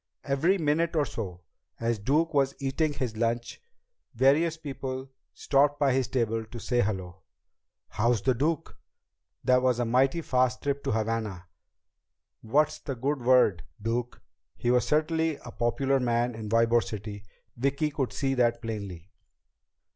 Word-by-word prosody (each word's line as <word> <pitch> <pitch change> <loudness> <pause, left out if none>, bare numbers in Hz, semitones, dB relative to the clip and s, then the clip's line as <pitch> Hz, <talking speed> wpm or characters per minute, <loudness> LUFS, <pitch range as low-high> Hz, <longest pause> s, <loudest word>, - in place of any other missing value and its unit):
Every 150 +8 +2
minute 165 +1 +1
or 150 -2 +3
so, 90 -9 -6 0.4
as 115 -1 0
Duke 155 +9 +1
was 140 -1 +2
eating 145 +3 0
his 125 -6 -3
lunch, 115 +1 -2 0.5
various 150 +7 +3
people 135 -3 -6 0.2
stopped 145 +1 +2
by 140 -3 +3
his 130 -2 +1
table 115 -3 0
to 110 +2 -10
say 120 +1 +1
hello. 95 -4 -3 0.7
"How's 115 -1 +1
the 130 - +3
Duke?" 150 +5 -1 0.7
"That 125 0 +4
was 125 -2 +2
a 120 - 0
mighty 130 +7 +2
fast 130 -3 +1
trip 140 0 -1
to - - 0
Havana!" 110 -4 -2 1.0
"What's 150 +7 +1
the 135 - -5
good 135 +3 -1
word, 120 -7 +4 0.2
Duke?" 115 +3 -2 0.4
He 125 +1 +3
certainly 160 +4 +1
was - - -12
a - - -7
popular 135 +3 +1
man 120 0 +1
in 110 -1 -6
Ybor 115 +1 +4
City, 100 0 -7 0.3
Vicki 140 +5 0
could 135 -3 -2
see 135 -1 -1
that 120 -2 +2
plainly. 100 -6 -6
125 Hz, 145 wpm, -28 LUFS, 115-140 Hz, 1.0 s, That